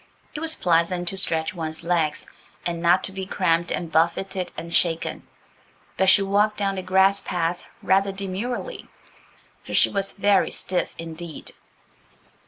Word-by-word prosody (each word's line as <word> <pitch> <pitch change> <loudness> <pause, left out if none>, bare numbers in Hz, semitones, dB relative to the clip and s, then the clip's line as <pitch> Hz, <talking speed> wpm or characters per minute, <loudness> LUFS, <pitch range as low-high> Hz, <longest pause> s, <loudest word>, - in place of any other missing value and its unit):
It 295 - -4
was 320 0 0
pleasant 175 +1 +1
to 195 - -6
stretch 160 -4 +2
one's 160 -2 -4
legs, 165 -3 0 0.4
and 170 -1 -2
not 175 +2 +4
to - - -5
be 190 -1 -6
cramped 170 -3 +1
and 170 -2 -3
buffeted 175 +4 0
and 170 0 -6
shaken. 165 -1 +1 0.7
But 190 0 +3
she 200 - +6
walked 205 +2 +2
down 200 -1 0
the 190 - -4
grass 190 +2 +3
path 175 0 -2 0.2
rather 195 +1 +3
demurely, 200 - -5 0.7
for - - -6
she - - +5
was 195 0 -1
very 200 -1 +3
stiff 180 -1 -1
indeed. 165 0 -8
185 Hz, 150 wpm, -24 LUFS, 170-195 Hz, 0.7 s, she